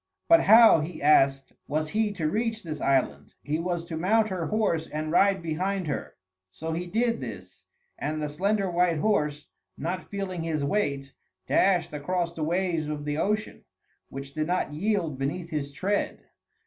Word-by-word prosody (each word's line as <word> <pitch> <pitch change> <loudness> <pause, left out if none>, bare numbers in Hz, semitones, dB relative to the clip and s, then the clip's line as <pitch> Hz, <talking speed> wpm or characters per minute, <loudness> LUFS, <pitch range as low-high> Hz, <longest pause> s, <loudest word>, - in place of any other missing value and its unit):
But 330 0 +6
how, 225 -4 +8
he 155 +2 -5
asked, 135 -2 +3
was 155 +1 -1
he 215 +2 0
to 165 -6 -2
reach 225 +5 -1
this 155 -3 -6
island? 135 -2 0
He 150 +2 -1
was 170 -1 -2
to 170 - -6
mount 215 +6 +2
her 180 -4 -3
horse 200 -7 0
and 155 +1 -4
ride 195 +1 +3
behind 185 +4 -1
her. 145 - -4 0.4
So 160 +11 -5
he 175 +2 -3
did 230 +4 0
this, - - -9 0.3
and 155 +1 -2
the 150 - -2
slender 195 +7 0
white 175 -2 +2
horse, 150 -6 0 0.3
not 180 +4 -4
feeling 195 -3 -4
his 155 -3 -1
weight, 140 -6 -1 0.3
dashed 185 -5 +2
across 170 +3 -2
the 165 - -7
waves 170 -1 0
of 150 -1 -4
the 150 +1 -2
ocean, 210 +4 -1 0.5
which 135 0 -8
did 155 +1 -2
not 180 -4 -1
yield 170 -5 -1
beneath 165 +6 -3
his 145 -2 -3
tread. 195 +8 -2
170 Hz, 170 wpm, -27 LUFS, 150-195 Hz, 0.5 s, how